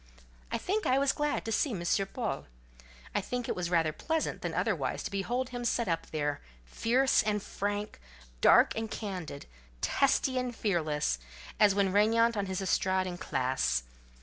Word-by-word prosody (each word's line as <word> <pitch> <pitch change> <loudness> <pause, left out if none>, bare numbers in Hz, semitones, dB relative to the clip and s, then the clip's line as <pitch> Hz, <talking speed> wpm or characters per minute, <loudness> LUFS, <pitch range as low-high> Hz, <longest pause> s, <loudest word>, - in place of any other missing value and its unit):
I - - 0
think 415 +3 -1
I 260 - +4
was 275 0 +3
glad 295 0 -1
to 225 - -3
see 280 - +2
M. 185 -6 -4 0.3
Paul; 235 -4 -3 0.7
I - - +1
think 245 +4 -3
it - - -1
was 175 -1 -2
rather 165 -3 +2
pleasant 320 - -2
than - - -2
otherwise, - - -1
to - - -4
behold 240 +6 -1
him 245 -1 -5
set 235 -1 0
up 165 -2 -1
there, 145 -2 -2 0.2
fierce 240 - +2
and 210 -1 0
frank, 205 - -3 0.4
dark - - +6
and 225 0 -3
candid, 180 -11 -5 0.3
testy 265 - +2
and 250 -1 -3
fearless, 155 - 0 0.4
as 205 -3 +5
when 195 -2 +2
regnant 230 +3 +4
on 200 -1 -1
his 190 0 -2
estrade 185 0 +1
in 175 -1 -5
class. 125 - 0
205 Hz, 170 wpm, -30 LUFS, 175-245 Hz, 0.7 s, dark